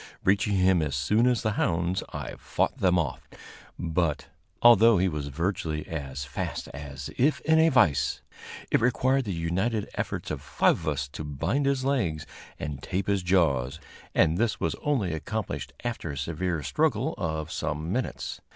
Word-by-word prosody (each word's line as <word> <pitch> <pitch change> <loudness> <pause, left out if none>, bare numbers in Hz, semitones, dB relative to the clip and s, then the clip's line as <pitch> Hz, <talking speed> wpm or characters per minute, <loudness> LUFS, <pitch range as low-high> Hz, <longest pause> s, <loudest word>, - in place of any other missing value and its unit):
Reaching 100 +1 +2
him 95 -2 +4
as 75 -3 -1
soon 105 - +2
as 125 -2 +2
the 110 - +1
hounds, 90 -2 0
I - - -5
fought - - -1
them 90 -1 +3
off; 80 -7 -2 0.5
but, 85 -2 -1 0.3
although 115 -2 +7
he 95 +2 +3
was 75 -4 -3
virtually 80 0 -2
as 70 -4 -5
fast - - -4
as 70 0 -7
if 145 +4 +3
in 160 0 +4
a 160 +1 +6
vise, 75 - +3 0.5
it - - +3
required 130 +2 +2
the 100 - -2
united 95 +6 -1
efforts - - -3
of - - -4
five - - +2
of 80 - -8
us 75 -2 -1
to 75 - -6
bind 80 - -1
his 135 -1 +1
legs 95 - 0 0.3
and 75 -3 -5
tape 95 +5 -2
his 100 -1 +1
jaws, 80 -6 +2 0.4
and 80 +3 +3
this 115 -1 +1
was - - 0
only 120 - 0
accomplished 80 - -4
after 120 -8 -3
a 70 - -5
severe 80 +2 -2
struggle - - +1
of 80 -1 -2
some 80 +1 -3
minutes. 125 +5 -3
85 Hz, 170 wpm, -27 LUFS, 75-110 Hz, 0.5 s, although